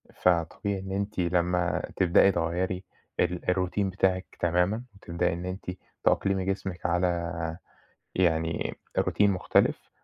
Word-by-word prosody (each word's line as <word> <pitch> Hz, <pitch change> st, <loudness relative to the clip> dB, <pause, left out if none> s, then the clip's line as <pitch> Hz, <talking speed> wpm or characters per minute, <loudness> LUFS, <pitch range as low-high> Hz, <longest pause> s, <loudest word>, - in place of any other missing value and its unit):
فطبيعي 90 Hz, +3 st, +1 dB
إن 95 Hz, 0 st, -7 dB
أنتِ 100 Hz, 0 st, -2 dB
لمّا 90 Hz, 0 st, +1 dB
تبدئي 95 Hz, +2 st, +5 dB
تغيّري 90 Hz, +2 st, -1 dB, 0.4 s
ال 90 Hz, +1 st, +1 dB
الroutine 95 Hz, +2 st, 0 dB
بتاعِك 95 Hz, -1 st, 0 dB
تمامًا 90 Hz, +7 st, +1 dB
وتبدئي 90 Hz, -2 st, -1 dB
إن 85 Hz, +1 st, -5 dB
أنتِ 90 Hz, 0 st, -4 dB, 0.3 s
تأقلمي 95 Hz, -1 st, +2 dB
جسمِك 95 Hz, -2 st, -3 dB
على 85 Hz, -1 st, 0 dB, 0.6 s
يعني 80 Hz, -2 st, +1 dB, 0.2 s
الroutine -, -, 0 dB
مختلف، 90 Hz, -2 st, +1 dB
90 Hz, 115 wpm, -28 LUFS, 85-95 Hz, 0.6 s, تبدئي